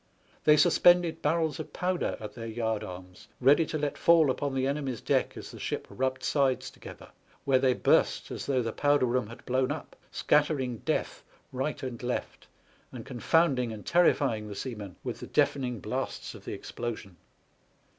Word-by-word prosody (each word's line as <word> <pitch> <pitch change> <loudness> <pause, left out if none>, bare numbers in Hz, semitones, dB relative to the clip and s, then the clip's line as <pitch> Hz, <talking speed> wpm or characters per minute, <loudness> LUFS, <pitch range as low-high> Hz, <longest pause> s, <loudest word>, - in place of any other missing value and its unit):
They 150 0 +7
sus 175 +2 +4
pended 175 -2 +5
barrels 160 +1 0
of 155 - -7
powder 180 0 -1
at 105 -2 -7
their 115 -1 -7
yard 110 -1 -2
arms, 90 0 -10
ready 145 +5 +5
to 155 - -2
let 145 -1 -3
fall 165 -5 +5
upon 140 +1 -3
the 130 0 +1
enemy's 135 -4 -2
deck - - 0
as - - -8
the - - -11
ship - - -3
rubbed 130 0 -2
sides 130 -3 +1
together, - - -12 0.4
where 135 -2 +4
they 130 -1 +3
burst - - +2
as - - -5
though 130 -3 +1
the 115 - -2
powder 145 -2 +3
room 125 -2 0
had 115 +3 -12
blown 130 +1 +1
up, 155 - -6
scattering 140 -6 +1
death - - -2 0.3
right 135 +3 -3
and 125 -3 -5
left, 125 0 -4 0.4
and 120 -3 -8
con 125 -3 -7
founding 135 -8 +2
and 105 -2 -8
terrifying 140 -10 +2
the 105 - -7
seamen 105 -5 -6
with - - -4
the - - -8
deafening 125 -4 +1
blasts - - -4
of - - -13
the - - -4
explosion. 110 -6 -6
130 Hz, 180 wpm, -29 LUFS, 120-150 Hz, 0.4 s, They